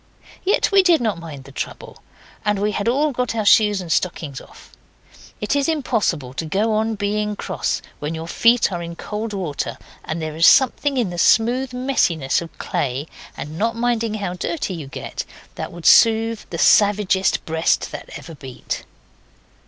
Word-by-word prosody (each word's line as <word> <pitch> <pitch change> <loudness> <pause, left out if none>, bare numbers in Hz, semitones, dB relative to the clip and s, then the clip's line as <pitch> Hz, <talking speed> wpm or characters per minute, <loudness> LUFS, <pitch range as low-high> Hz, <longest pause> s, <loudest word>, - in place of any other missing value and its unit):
Yet 405 +5 +2
we 395 -1 +6
did 350 -3 +4
not 220 -7 -1
mind 155 -5 -9
the 135 - -13
trouble. - - -7 0.4
And 210 -1 +1
we 205 +2 0
had 205 +1 -2
all 290 +5 +2
got 250 -2 -2
our 220 -2 -1
shoes 210 -1 +5
and 170 -3 -6
stockings 155 -6 -1
off. - - -16 0.7
It 210 +6 -1
is 285 +2 +1
impossible 210 - -1
to 160 - -4
go 210 +7 +1
on 220 +1 0
being 210 +1 -1
cross 190 -2 -2 0.2
when 150 +2 -3
your 160 +1 -6
feet 230 +4 +3
are 175 -2 -3
in 170 0 -6
cold 215 +5 -5
water; 180 -8 -3 0.3
and 160 +1 -4
there 155 -1 -4
is 165 +1 +5
something 275 +1 +4
in 225 -8 0
the 175 - -5
smooth 245 +7 +3
messiness 245 - +1
of 170 - -10
clay, 135 +1 -2 0.3
and 155 +3 -6
not 230 +1 0
minding 230 -2 0
how 200 -4 -3
dirty 190 - -3
you 160 -5 -7
get, 135 - -6 0.3
that - - -6
would 170 -1 -10
soothe 225 -1 +5
the 170 - -5
savagest 200 0 +3
breast 160 +1 0
that - - -8
ever 165 - -10
beat. 135 -4 -6
205 Hz, 175 wpm, -21 LUFS, 165-230 Hz, 0.7 s, we